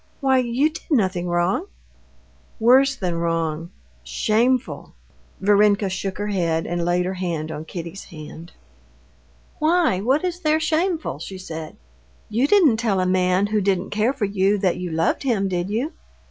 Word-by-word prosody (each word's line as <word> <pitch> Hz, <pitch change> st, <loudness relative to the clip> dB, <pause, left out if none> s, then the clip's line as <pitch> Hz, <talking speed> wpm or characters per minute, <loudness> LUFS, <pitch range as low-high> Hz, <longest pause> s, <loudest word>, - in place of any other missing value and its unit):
Why, 265 Hz, -2 st, +3 dB
you 255 Hz, +5 st, +1 dB
did 315 Hz, -, -11 dB
nothing 185 Hz, -, +1 dB
wrong?" 175 Hz, -, 0 dB, 0.9 s
"Worse 265 Hz, +4 st, +5 dB
than 175 Hz, -7 st, -2 dB
wrong—shameful." 165 Hz, -, -2 dB, 0.4 s
Varenka 205 Hz, 0 st, +3 dB
shook 190 Hz, 0 st, -4 dB
her 205 Hz, +1 st, -3 dB
head 165 Hz, -5 st, 0 dB
and 175 Hz, 0 st, -2 dB
laid 175 Hz, +1 st, +1 dB
her 185 Hz, -, -2 dB
hand 170 Hz, -4 st, -3 dB
on 155 Hz, 0 st, -6 dB
Kitty's 170 Hz, +3 st, -7 dB
hand. 160 Hz, +1 st, -11 dB, 1.1 s
"Why, 320 Hz, -, +2 dB
what 270 Hz, -, +1 dB
is 355 Hz, -1 st, -3 dB
there 310 Hz, -2 st, +2 dB
shameful?" 320 Hz, -, -1 dB
she 190 Hz, +4 st, -7 dB
said. 160 Hz, -4 st, -7 dB, 0.5 s
"You 235 Hz, +6 st, +1 dB
didn't 320 Hz, -, +5 dB
tell 220 Hz, -4 st, 0 dB
a 185 Hz, -, +1 dB
man, 185 Hz, +1 st, +2 dB
who 210 Hz, 0 st, 0 dB
didn't 190 Hz, -1 st, 0 dB
care 215 Hz, +4 st, +1 dB
for 270 Hz, -6 st, -2 dB
you, 200 Hz, +1 st, +1 dB
that 185 Hz, -3 st, 0 dB
you 180 Hz, 0 st, -4 dB
loved 165 Hz, 0 st, 0 dB
him, 225 Hz, -8 st, 0 dB
did 180 Hz, 0 st, -2 dB
you?" 245 Hz, -, -2 dB
195 Hz, 155 wpm, -22 LUFS, 175-250 Hz, 1.1 s, Worse